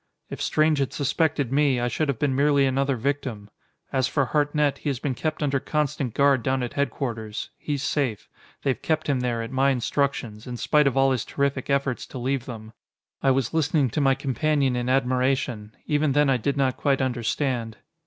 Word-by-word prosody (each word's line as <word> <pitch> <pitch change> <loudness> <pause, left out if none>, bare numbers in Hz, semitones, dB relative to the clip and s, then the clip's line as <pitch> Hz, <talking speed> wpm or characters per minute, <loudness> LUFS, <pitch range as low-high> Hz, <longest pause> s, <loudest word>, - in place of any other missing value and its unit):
If - - -6
Strange 155 -1 +2
had 135 - -1
suspected 145 -2 0
me, 140 -2 +3
I 120 - 0
should 150 +6 -1
have 140 -4 -1
been 140 0 0
merely 140 0 +3
another 135 +1 +1
victim. 120 -5 -3 0.4
As 130 -1 +2
for 140 0 +1
Hartnett, 145 +1 +1
he 150 - -2
has 135 - -1
been 130 +1 -2 0.3
under 140 -2 +1
constant 145 -4 -2
guard 140 -2 +4
down 130 +1 0
at 120 - -4
headquarters. 115 -6 -3
He's 145 -2 -3
safe. 135 -7 -1 0.4
They've 135 -2 0
kept 155 -1 0
him 140 -3 +1
there, 120 -2 -1
at 115 - -7
my 135 +1 +3
instructions, 125 -4 -1
in 125 -1 -5
spite 150 +3 +3
of 135 - 0
all 135 0 +4
his 125 -4 0
terrific 140 -1 -2
efforts 140 -2 0
to - - -8
leave 130 +1 -1
them." 110 -3 -9 0.5
I 135 - +3
was 130 0 +1
listening 155 -5 +2
to 150 - 0
my 135 -1 +4
companion 140 0 0
in 125 0 -1
admiration. 130 -4 0
Even 150 -1 +1
then 145 -1 +3
I 130 - +3
did 140 +4 -1
not 130 -2 +1
quite 140 -2 +1
understand. 120 -2 -1
135 Hz, 195 wpm, -25 LUFS, 125-145 Hz, 0.5 s, guard